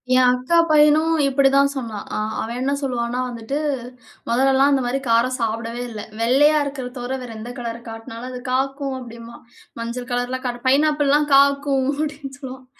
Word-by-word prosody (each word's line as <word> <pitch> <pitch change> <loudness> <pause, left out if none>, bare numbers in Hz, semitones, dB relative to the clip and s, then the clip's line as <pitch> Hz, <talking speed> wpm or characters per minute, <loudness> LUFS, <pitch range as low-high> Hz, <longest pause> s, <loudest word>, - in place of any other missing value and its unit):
என் 255 0 +5
அக்கா 255 +7 +1
பையனும் 310 +2 +5
இப்டிதான் 275 0 +3
சொன்னான். 225 -6 -5
ஆ - - -1 0.2
அவன் 235 +2 -4
என்ன 275 +2 0
சொல்லுவான்னா 245 -2 -2
வந்துட்டு 235 +3 -4 0.7
மொதல்லலாம், 265 +3 +4
அந்த 275 -2 +2
மாரி 255 +3 -1
காரம் 235 +3 +3
சாப்டவே 230 +1 -2
இல்ல, 215 -2 -7 0.2
வெள்ளையா 290 +6 +4
இருக்குற 275 -3 -5
தவிர 250 +2 -3
வேற 245 -2 -8
எந்த 235 +3 -7
கலர 235 -2 -4
காட்டுனாலும் 225 +2 -8
அது 250 - -6
காக்கும் 270 +1 -1
அப்டினுவா. 235 -1 -10 0.4
மஞ்சள் 240 +2 -5
கலர்லாம் 250 +2 -2
காட் 240 -1 -3
பைனாப்பிள்லாம் 295 +1 +3
காக்கும் 280 -1 +3
அப்டின்னு 285 -2 -5
சொல்லுவான். 260 -1 -9
255 Hz, 155 wpm, -21 LUFS, 235-275 Hz, 0.7 s, என்